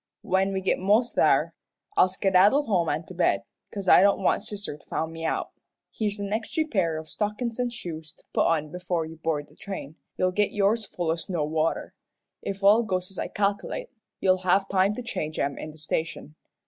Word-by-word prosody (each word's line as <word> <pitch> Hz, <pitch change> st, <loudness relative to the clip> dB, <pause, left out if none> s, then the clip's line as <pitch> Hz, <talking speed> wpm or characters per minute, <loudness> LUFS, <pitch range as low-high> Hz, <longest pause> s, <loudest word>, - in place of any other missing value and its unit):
When 190 Hz, +1 st, +2 dB
we 190 Hz, -1 st, -1 dB
git 190 Hz, -, +1 dB
mos' 210 Hz, +6 st, +3 dB
there, -, -, +3 dB, 0.4 s
I'll 185 Hz, -, +5 dB
skedaddle 195 Hz, +8 st, +4 dB
home 180 Hz, -6 st, +1 dB
an' 155 Hz, +3 st, -1 dB
to 185 Hz, -, -10 dB
bed, 145 Hz, -, +2 dB, 0.3 s
'cause 200 Hz, -2 st, -6 dB
I -, -, +8 dB
don't 200 Hz, 0 st, +3 dB
want -, -, +3 dB
sister 205 Hz, -6 st, -4 dB
to 145 Hz, -, -19 dB
find 160 Hz, +1 st, -2 dB
me 165 Hz, 0 st, -7 dB
out. 160 Hz, -, -1 dB, 0.4 s
Here's 210 Hz, -2 st, -2 dB
an 200 Hz, 0 st, -3 dB
extry 230 Hz, +8 st, -1 dB
pair 180 Hz, -, 0 dB
o' 160 Hz, -, -5 dB
stockin's 210 Hz, +7 st, -3 dB
an' 245 Hz, -1 st, +1 dB
shoes 160 Hz, -9 st, -7 dB
to -, -, -27 dB
put -, -, +3 dB
on 155 Hz, -2 st, 0 dB
before 180 Hz, -2 st, -2 dB
you 160 Hz, +1 st, -10 dB
board 155 Hz, -2 st, -2 dB
the -, -, -22 dB
train. 160 Hz, -6 st, -7 dB, 0.2 s
You'll 185 Hz, 0 st, +2 dB
git 205 Hz, +2 st, +1 dB
yours 210 Hz, +2 st, +2 dB
full 175 Hz, -4 st, -2 dB
o' -, -, +1 dB
snow 170 Hz, -2 st, -2 dB
water. 160 Hz, +1 st, -1 dB, 0.5 s
If 195 Hz, 0 st, -5 dB
all 210 Hz, +4 st, +7 dB
goes 185 Hz, -4 st, -2 dB
as 195 Hz, -, -8 dB
I -, -, -1 dB
calc'late, 205 Hz, +5 st, -2 dB, 0.3 s
you'll 185 Hz, -1 st, +3 dB
have 185 Hz, +2 st, +2 dB
time 195 Hz, +2 st, +2 dB
to 250 Hz, -, -5 dB
change 155 Hz, -10 st, -4 dB
'em 140 Hz, 0 st, -1 dB
in 155 Hz, -, -6 dB
the 155 Hz, -, -13 dB
station. 155 Hz, 0 st, -3 dB
185 Hz, 210 wpm, -26 LUFS, 160-205 Hz, 0.5 s, I